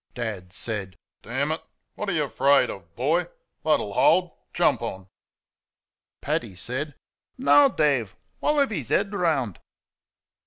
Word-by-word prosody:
Dad 105 -7 -5
said: 100 -3 -2 0.2
"Damn 135 +6 -2
it, 160 - -2 0.3
what 210 - -4
are - - +1
y' 155 -5 0
'FRAID 140 +4 +3
o', - - -7 0.2
boy? 150 +8 +1 0.4
THAT'll - - +1
hold 185 - +4 0.2
jump - - +2
on." 95 0 -6 1.1
Paddy 95 - -2
said: 130 - -2 0.4
"NOW, 280 +2 +6
Dave, 140 - +1 0.2
while 300 - +1
I've 280 -4 +3
'is 150 - -3
'ead 200 - +1
round." 155 - 0
140 Hz, 130 wpm, -25 LUFS, 110-175 Hz, 1.1 s, NOW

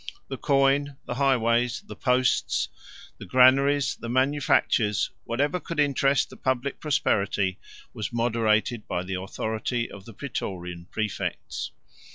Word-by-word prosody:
The 135 - -4
coin, 140 0 +2
the - - -3
highways, 120 -2 +2
the - - -9
posts, 125 -1 +1 0.5
the - - -8
granaries, 135 +5 +4
the 115 - -7
manufactures, 130 -5 +2
whatever 145 +9 0
could 165 -2 -5
interest 140 -2 +2
the - - -11
public 130 +1 -1
prosperity, 100 - 0 0.3
was 110 - -4
moderated 115 -1 +1
by 90 - -2
the 95 0 -4
authority 110 +4 -3
of 100 -1 -11
the 115 - -12
Prætorian 90 -9 -5
præfects. 110 -3 -3
120 Hz, 125 wpm, -26 LUFS, 110-140 Hz, 0.5 s, granaries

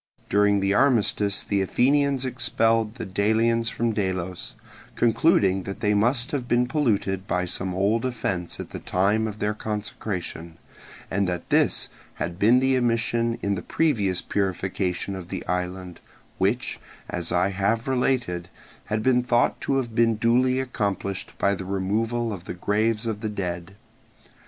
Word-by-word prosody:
During 100 0 +3
the 100 0 +2
armistice 105 -5 +2
the 100 -1 0
Athenians 135 +6 +2
expelled 115 -3 +1
the 120 - -5
Delians 115 +4 +1
from 115 +1 0
Delos, 95 -3 -3 0.4
concluding 105 - +3
that 95 +1 -7
they 105 0 +2
must 120 +4 +2
have 130 -4 -2
been 120 0 +3
polluted 105 -9 0
by 90 -3 0
some 90 +1 -2
old 105 +4 +1
offence 95 -9 -2
at - - -7
the - - -6
time 105 +4 +1
of 105 -1 -6
their 105 0 0
consecration, 100 -6 -5 0.5
and 95 0 +1
that 90 -1 -5
this - - +2 0.3
had 85 +1 -4
been 115 +5 +5
the 130 0 +2
omission 115 -1 +1
in 100 - +1
the 95 - -3
previous 105 - 0
purification 95 -1 -2
of 95 -2 -7
the - - -5
island, 90 0 -3 0.4
which, 100 +6 0 0.3
as 85 -1 -2
I 90 +2 +2
have 100 +5 0
related, 125 -9 0 0.4
had 110 0 -2
been 125 0 +4
thought 120 -1 +1
to 135 - 0
have 120 -4 -2
been 115 0 +3
duly 125 +4 +2
accomplished 100 -8 -3
by 100 +3 +2
the 95 - -4
removal 110 +5 -1
of 90 -3 -8
the - - -5
graves 105 +4 0
of 110 -2 -3
the 110 - -2
dead. 90 -2 -4
105 Hz, 155 wpm, -25 LUFS, 95-120 Hz, 0.5 s, been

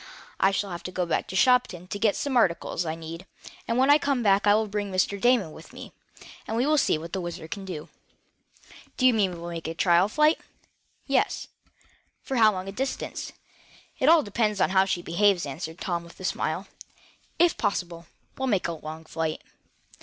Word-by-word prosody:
I 195 - +5
shall 195 0 -2
have 170 - -5
to 185 - -4
go 180 -1 -1
back 170 - -1
to 190 - -7
Shopton 220 -6 +3
to 205 - -4
get 210 -1 +2
some 280 -2 -2
articles 175 -5 +1
I 160 - -2
need, 165 +3 -9 0.4
and 230 - 0
when 265 +2 +5
I 295 - +6
come 275 -4 0
back 200 0 +3
I 205 - +6
will 220 +1 +2
bring 205 -1 -3
Mr. 190 +1 0
Damon 240 -9 +3
with 160 - -13
me, - - -10 0.6
and 225 - -2
we 245 - +2
will 305 0 +3
see 160 - +2
what 165 +2 -9
the 190 - -1
WHIZZER 175 -1 -6
can 195 +4 -6
do." 165 -5 -6 1.1
"Do 255 - +1
you 255 - +7
mean 200 -4 +2
we 175 - -7
will 170 +1 -6
make 165 -2 -5
a 165 - -4
trial 175 +3 +3
flight?" 305 +6 +3 0.7
"Yes." - - 0 0.7
"For 265 - -3
how 220 -2 +6
long 185 -1 -5
a - - -4
distance?" 265 +6 -4 0.7
"It 275 +1 +4
all 330 -1 +6
depends 210 -1 0
on - - +2
how 190 0 +4
she 180 -2 -2
behaves," 190 +1 +2
answered 155 +4 -6
Tom, 175 -3 -2
with 170 - -15
a - - -9
smile. - - -2 0.7
"If 345 0 +4
possible, 175 -5 -3 0.3
we'll 265 - -1
make 200 -7 +1
a - - -2
long 160 0 -8
flight." 160 0 -3
195 Hz, 205 wpm, -26 LUFS, 170-230 Hz, 1.1 s, you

